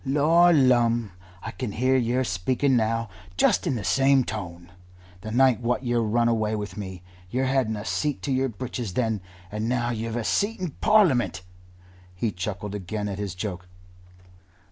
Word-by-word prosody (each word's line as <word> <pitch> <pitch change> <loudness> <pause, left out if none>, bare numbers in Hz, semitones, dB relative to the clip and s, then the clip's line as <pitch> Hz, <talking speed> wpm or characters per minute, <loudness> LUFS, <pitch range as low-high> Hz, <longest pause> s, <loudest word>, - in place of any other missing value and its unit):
"Lor 155 +6 +4
lumme! 120 - +3 0.3
I 110 - -5
can 120 -5 -5
hear 130 +3 +2
yer 125 +1 +1
speaking 125 +7 0
now 115 0 +1 0.3
just 175 - +3
in 140 - 0
the 110 - -4
same 135 +8 +3
tone 90 -6 -7 0.5
the 110 - -6
night 125 +1 +4
what 125 +2 -1
yer 120 -1 +1
run 115 +2 +2
away 110 -2 +1
with 105 -3 -5
me. 95 -3 -7 0.3
Yer 130 +6 -1
hadn't 130 -4 +1
a 105 0 -6
seat 150 +3 -2
to 140 - -2
yer 130 0 +1
breeches 120 -3 -5
then, 110 -5 0 0.3
and 105 +2 -2
now 120 -1 0
you've 115 0 -3
a 120 - -1
seat 205 - 0
in 180 -4 -3
Parliament." 175 - +2 0.7
He 110 +4 -1
chuckled 100 +2 -5
again 105 +1 -4
at 100 -1 -5
his 100 -4 -4
joke. 90 -2 -5
115 Hz, 170 wpm, -25 LUFS, 105-130 Hz, 0.7 s, Lor